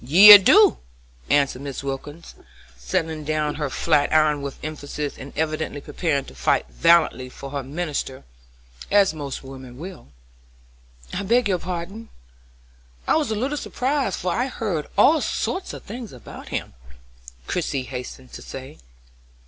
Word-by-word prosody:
"Yee, 185 Hz, +11 st, +10 dB
I -, -, +14 dB
do!" 390 Hz, -, +5 dB, 0.5 s
answered 140 Hz, -2 st, +2 dB
Mrs. 140 Hz, -1 st, -6 dB
Wilkins, 145 Hz, +4 st, -6 dB, 0.4 s
setting 155 Hz, -, -2 dB
down 150 Hz, 0 st, -1 dB
her 145 Hz, -, -1 dB
flat 145 Hz, +2 st, +1 dB
iron 155 Hz, -2 st, +3 dB
with 140 Hz, -1 st, -6 dB
emphasis, 150 Hz, -1 st, -5 dB
and 140 Hz, -, -10 dB
evidently 155 Hz, -2 st, -2 dB
preparing 140 Hz, -1 st, -2 dB
to -, -, -12 dB
fight 65 Hz, -1 st, +1 dB
valiantly 165 Hz, -6 st, +3 dB
for 135 Hz, +1 st, -10 dB
her 140 Hz, -1 st, -3 dB
minister, 145 Hz, -1 st, -4 dB, 0.7 s
as 200 Hz, -4 st, +4 dB
most 145 Hz, -4 st, -6 dB
women 130 Hz, -2 st, -11 dB
will. 180 Hz, -, -9 dB, 1.1 s
"I -, -, -2 dB
beg 235 Hz, +4 st, +2 dB
your 185 Hz, -3 st, 0 dB
pardon; 185 Hz, +6 st, -6 dB, 1.0 s
I -, -, +3 dB
was 310 Hz, -5 st, +1 dB
a 220 Hz, -, -1 dB
little 265 Hz, +7 st, -2 dB
surprised, 265 Hz, -6 st, -1 dB
for 180 Hz, -, -1 dB
I'd 250 Hz, +5 st, -1 dB
heard 180 Hz, -, -3 dB
all 315 Hz, +2 st, +5 dB
sorts 375 Hz, -, -2 dB
of -, -, -9 dB
things 230 Hz, +1 st, -8 dB
about 125 Hz, -3 st, -11 dB
him," -, -, -4 dB, 0.7 s
Christie 135 Hz, -, -2 dB
hastened 125 Hz, 0 st, -8 dB
to -, -, -8 dB
say. 130 Hz, 0 st, -9 dB
155 Hz, 150 wpm, -23 LUFS, 140-200 Hz, 1.1 s, I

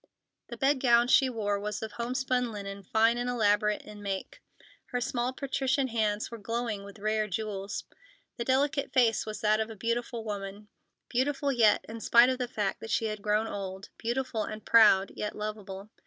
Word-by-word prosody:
The 235 Hz, -, -8 dB
bed 270 Hz, +3 st, +2 dB
gown 240 Hz, -1 st, +4 dB
she 265 Hz, -1 st, +5 dB
wore 205 Hz, -4 st, -1 dB
was 210 Hz, +1 st, -4 dB
of 220 Hz, -, -5 dB
homespun 250 Hz, 0 st, -1 dB
linen, 200 Hz, -1 st, -6 dB
fine 225 Hz, +5 st, +2 dB
and 245 Hz, 0 st, -1 dB
elaborate 210 Hz, -3 st, +2 dB
in 210 Hz, -1 st, -11 dB
make; 200 Hz, -, -5 dB, 0.5 s
her 245 Hz, -, -2 dB
small, 245 Hz, 0 st, -1 dB
patrician 265 Hz, 0 st, -1 dB
hands 215 Hz, -2 st, -1 dB
were 230 Hz, -, -7 dB
glowing 225 Hz, -1 st, -3 dB
with 200 Hz, +1 st, -11 dB
rare 215 Hz, +1 st, 0 dB
jewels. 200 Hz, 0 st, -4 dB, 0.5 s
The 235 Hz, -, -2 dB
delicate 280 Hz, +3 st, +1 dB
face 235 Hz, -4 st, +3 dB
was 215 Hz, -1 st, -5 dB
that 215 Hz, 0 st, +3 dB
of 220 Hz, 0 st, -1 dB
a 225 Hz, -, -8 dB
beautiful 235 Hz, +2 st, -2 dB
woman; 205 Hz, -1 st, -6 dB, 0.4 s
beautiful 275 Hz, +3 st, 0 dB
yet, 225 Hz, -5 st, +4 dB
in 225 Hz, +1 st, -7 dB
spite 235 Hz, +3 st, +6 dB
of 260 Hz, 0 st, -1 dB
the 250 Hz, -, -1 dB
fact 210 Hz, -5 st, -2 dB
that 225 Hz, -, -8 dB
she 225 Hz, -, +1 dB
had 215 Hz, -1 st, -3 dB
grown 210 Hz, +1 st, +1 dB
old; 195 Hz, -1 st, -6 dB
beautiful 235 Hz, -1 st, -1 dB
and 215 Hz, +1 st, -7 dB
proud, 210 Hz, -4 st, +6 dB
yet 210 Hz, -, -4 dB
lovable. 210 Hz, -1 st, -6 dB
220 Hz, 185 wpm, -29 LUFS, 210-245 Hz, 0.5 s, spite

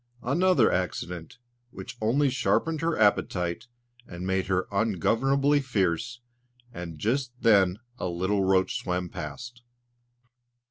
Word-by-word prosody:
Another 155 Hz, -1 st, +3 dB
accident 90 Hz, +2 st, -3 dB, 0.3 s
which 125 Hz, 0 st, -9 dB
only 130 Hz, +6 st, +2 dB
sharpened 155 Hz, +4 st, 0 dB
her 165 Hz, 0 st, 0 dB
appetite 90 Hz, -3 st, +1 dB, 0.4 s
and 90 Hz, 0 st, -7 dB
made 95 Hz, 0 st, 0 dB
her 95 Hz, -1 st, 0 dB
ungovernably 120 Hz, -, +2 dB
fierce; 115 Hz, -1 st, -1 dB, 0.5 s
and 85 Hz, -3 st, -7 dB
just 125 Hz, -, -1 dB
then 100 Hz, -5 st, +4 dB, 0.2 s
a -, -, -2 dB
little 95 Hz, +3 st, 0 dB
roach 95 Hz, 0 st, +2 dB
swam 90 Hz, -1 st, -3 dB
past. 120 Hz, -, -8 dB
105 Hz, 110 wpm, -27 LUFS, 90-125 Hz, 0.5 s, then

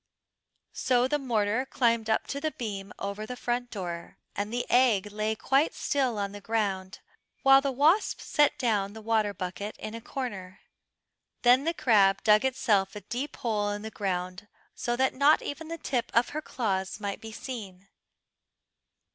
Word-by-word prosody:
So 250 Hz, -1 st, +2 dB
the 295 Hz, +2 st, 0 dB
mortar 225 Hz, -2 st, 0 dB
climbed 235 Hz, -4 st, +1 dB
up 220 Hz, -, +2 dB
to 280 Hz, -, -3 dB
the 310 Hz, -, 0 dB
beam 200 Hz, -8 st, -6 dB
over 200 Hz, +2 st, -4 dB
the 250 Hz, -, -5 dB
front 245 Hz, 0 st, -2 dB
door, 175 Hz, -5 st, -6 dB, 0.2 s
and 205 Hz, +1 st, -2 dB
the 245 Hz, +1 st, -1 dB
egg 220 Hz, -6 st, +3 dB
lay 215 Hz, +1 st, -1 dB
quite 270 Hz, +7 st, +1 dB
still 265 Hz, -6 st, 0 dB
on 200 Hz, -1 st, -2 dB
the 205 Hz, 0 st, -9 dB
ground, 195 Hz, -4 st, -2 dB, 0.4 s
while 270 Hz, 0 st, +7 dB
the 275 Hz, 0 st, -1 dB
wasp 305 Hz, -, +3 dB
set 295 Hz, -1 st, +2 dB
down 205 Hz, -5 st, 0 dB
the 220 Hz, -, -9 dB
water 220 Hz, -2 st, +1 dB
bucket 195 Hz, +2 st, -5 dB
in 215 Hz, -, -7 dB
a 230 Hz, -, -6 dB
corner. 200 Hz, -8 st, -6 dB, 0.8 s
Then 250 Hz, +3 st, +5 dB
the 330 Hz, +1 st, 0 dB
crab 200 Hz, -8 st, +4 dB
dug 215 Hz, +1 st, +5 dB
itself 210 Hz, -7 st, +1 dB
a 210 Hz, -, -6 dB
deep 260 Hz, +8 st, -4 dB
hole 210 Hz, -3 st, -1 dB
in 205 Hz, 0 st, -4 dB
the 220 Hz, -, -6 dB
ground, 185 Hz, 0 st, -3 dB, 0.3 s
so 240 Hz, -, -2 dB
that 260 Hz, +1 st, +2 dB
not 285 Hz, +3 st, +4 dB
even 315 Hz, +3 st, -5 dB
the 330 Hz, +1 st, -5 dB
tip 250 Hz, -6 st, -2 dB
of 235 Hz, +1 st, +4 dB
her 310 Hz, -, -4 dB
claws 195 Hz, -9 st, -2 dB
might 200 Hz, -2 st, -4 dB
be 225 Hz, -, -8 dB
seen. 200 Hz, -6 st, -8 dB
220 Hz, 170 wpm, -28 LUFS, 200-260 Hz, 0.8 s, while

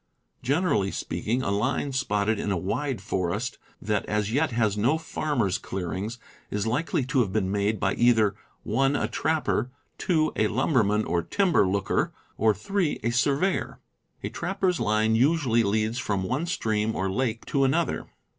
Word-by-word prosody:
Generally 140 Hz, -, +1 dB
speaking, 125 Hz, +4 st, -2 dB
a 100 Hz, -, -1 dB
line 130 Hz, +7 st, 0 dB
spotted 110 Hz, -5 st, 0 dB
in 100 Hz, -, -1 dB
a 95 Hz, -, +1 dB
wide 105 Hz, -, -2 dB
forest 95 Hz, +5 st, -2 dB, 0.2 s
that 105 Hz, 0 st, -1 dB
as 105 Hz, +1 st, -1 dB
yet 155 Hz, +4 st, +2 dB
has 110 Hz, -4 st, +1 dB
no 120 Hz, +9 st, +2 dB
farmers' 145 Hz, -, -1 dB
clearings 95 Hz, +5 st, -4 dB, 0.3 s
is 105 Hz, 0 st, -2 dB
likely 130 Hz, +3 st, 0 dB
to 130 Hz, +1 st, +1 dB
have 110 Hz, -6 st, +1 dB
been 95 Hz, -2 st, 0 dB
made 100 Hz, +1 st, 0 dB
by 95 Hz, +1 st, +1 dB
either 115 Hz, -4 st, +4 dB, 0.3 s
(1) 135 Hz, +1 st, +1 dB
a -, -, 0 dB
trapper, 155 Hz, -5 st, 0 dB, 0.3 s
(2) 155 Hz, -4 st, +1 dB
a 110 Hz, -, +3 dB
lumberman 110 Hz, -3 st, +2 dB
or 85 Hz, -, 0 dB
timber 175 Hz, -, +2 dB
looker, 100 Hz, +1 st, 0 dB, 0.2 s
or 110 Hz, +1 st, +3 dB
(3) 165 Hz, -, -1 dB
a 115 Hz, -, +1 dB
surveyor. 140 Hz, +9 st, +1 dB, 0.5 s
_,, 110 Hz, -, 0 dB
usually 130 Hz, -2 st, +3 dB
leads 110 Hz, +3 st, 0 dB
from 100 Hz, -2 st, -1 dB
one 130 Hz, -, -1 dB
stream 110 Hz, -10 st, 0 dB
or 95 Hz, -, -1 dB
lake 115 Hz, +3 st, -1 dB
r. -, -, -11 dB
to 140 Hz, -, +3 dB
another. 150 Hz, +6 st, 0 dB
115 Hz, 155 wpm, -26 LUFS, 105-140 Hz, 0.5 s, either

